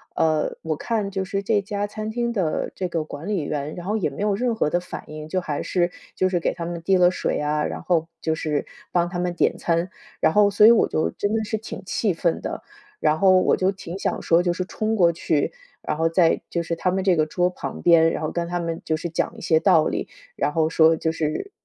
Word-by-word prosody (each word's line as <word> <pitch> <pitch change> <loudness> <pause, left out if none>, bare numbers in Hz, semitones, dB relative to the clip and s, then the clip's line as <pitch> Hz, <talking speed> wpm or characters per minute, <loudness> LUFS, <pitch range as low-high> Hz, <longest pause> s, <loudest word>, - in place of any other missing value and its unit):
呃， 155 -1 +1
我 160 -1 -1
看 210 +3 -2
就 190 -1 -2
是 195 +1 -3
这 205 -1 +2
家 205 0 -3
餐 215 +1 -5
厅 235 +1 -1
的 180 -8 -1
这 185 - -3
个 165 -2 -1
管 155 +3 -8
理 195 -7 -1
员， 145 +1 -3
然 175 0 -8
后 210 +2 -1
也 185 -8 0
没 170 +9 -5
有 210 -1 +2
任 235 +2 0
何 150 - 0
的 175 - +2
反 180 - -8
应， 155 0 -8
就 185 - 0
还 150 -5 -3
是 175 -1 0 0.2
就 185 - +2
是 175 -2 0
给 - - 0
他 170 -1 -5
们 170 -1 -5
递 190 +3 +3
了 180 0 +5
水 - - -1
啊， 150 0 0
然 - - -4
后 165 -2 +1
就 160 - 0
是 155 -2 -2 0.3
帮 175 -1 +2
他 175 0 -4
们 175 -1 -1
点 - - +2
餐， 170 +2 -1 0.3
然 160 - +3
后 210 -1 +5
所 205 +1 +5
以 230 - +10
我 235 - +4
就 155 - 0
真 205 - -2
的 220 0 0
是 220 +1 -2
挺 220 - -8
气 195 +2 0
愤 170 0 0
的， - - -5 0.4
然 155 +1 +2
后 185 -1 +6
我 - - +3
就 190 +1 +1
挺 190 -1 -8
想 - - -1
说 170 +1 +4
就 175 - +1
是 185 +1 -3
冲 215 +2 -2
过 175 -4 +4
去， 160 -2 -1 0.3
然 - - -2
后 165 +1 +2
在 165 -1 +3
就 170 - -1
是 170 - -2
他 180 +2 0
们 190 0 -1
这 185 -2 +4
个 155 - +2
桌 180 +2 +1
旁 - - -6
边， 165 -1 +6
然 - - -3
后 155 - -2
跟 170 -1 -2
他 175 0 -2
们 165 -1 -3
就 155 - 0
是 170 - -4
讲 160 - -2
一 - - -10
些 160 -1 +3
道 160 -1 +4
理。 - - -2 0.3
然 - - 0
后 160 -1 +2
说 160 0 +5
就 160 0 -1
是 160 - -3
175 Hz, 275 characters per minute, -23 LUFS, 160-195 Hz, 0.4 s, 以